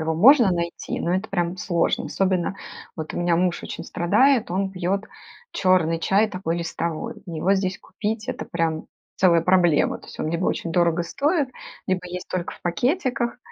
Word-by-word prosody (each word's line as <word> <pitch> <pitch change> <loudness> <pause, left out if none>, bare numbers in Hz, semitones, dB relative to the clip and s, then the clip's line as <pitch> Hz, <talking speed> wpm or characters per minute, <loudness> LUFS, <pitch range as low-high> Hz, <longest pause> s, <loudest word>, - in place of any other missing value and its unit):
его 160 0 -1
можно 235 - +7
найти, 170 -1 -3
но 175 - 0
это 195 +4 -2
прям 175 -2 -1
сложно. 175 -2 0
Особенно 185 -1 0 0.4
вот 155 -2 -6
у - - -3
меня 175 -1 +2
муж 180 0 0
очень - - -6
страдает, 230 +7 +2
он 190 +1 0
пьет 195 +2 -1 0.5
черный 175 -3 +2
чай, 200 +5 +2
такой 175 -4 -3
листовой. 165 -1 -4
Его 175 +3 +1
здесь 190 -1 -1
купить, 215 0 -4
это - - -3
прям 165 -2 -1 0.3
целая 170 -3 +5
проблема. 175 -3 +3
То - - -16
есть - - -11
он - - -1
либо 170 +3 -1
очень 165 -2 -1
дорого 175 0 +2
стоит, 290 - 0 0.4
либо 185 -1 0
есть 180 +1 -6
только 180 -1 -3
в - - -14
пакетиках, 245 - 0
180 Hz, 175 wpm, -23 LUFS, 170-200 Hz, 0.5 s, можно